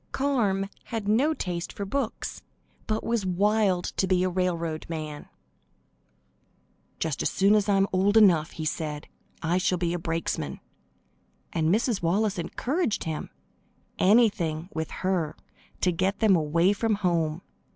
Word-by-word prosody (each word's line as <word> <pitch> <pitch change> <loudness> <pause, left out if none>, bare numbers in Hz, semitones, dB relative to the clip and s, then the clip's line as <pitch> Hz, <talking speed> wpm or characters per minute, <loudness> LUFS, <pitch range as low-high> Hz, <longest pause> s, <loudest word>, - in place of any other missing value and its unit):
Carm 220 -9 +1 0.2
had 225 -4 -4
no 270 +9 +3
taste 175 - -4
for 200 - -5
books, 245 +3 -3 0.5
but 215 0 -1
was 230 -3 0
wild 190 0 +2
to 190 - +2
be 185 -1 +2
a 185 - +1
railroad 170 -3 -1
man. 155 -3 -5 1.7
"Just 155 -4 -2
as - - +1
soon 200 +2 +3
as 210 -1 +2
I 200 - +4
am 195 - +4
old 200 +3 +3
enough," 175 -7 +5
he 160 - -5
said, 150 -1 -3 0.4
"I 170 +3 +1
shall 180 0 +1
be 170 -1 -1
a 175 - -2
brakesman;" 165 0 -3 0.9
and 160 -1 +1
Mrs. 220 +2 +1
Wallace 195 +3 +1
encouraged 245 - -1
him. 160 -2 -4 0.7
Anything, 185 -6 +3
with 160 -1 -3
her, 185 -5 -1 0.5
to 180 - +3
get 190 +4 0
them 215 -3 +4
away 170 +4 +2
from 220 +1 0
home. 170 -4 0
185 Hz, 145 wpm, -27 LUFS, 165-210 Hz, 1.7 s, enough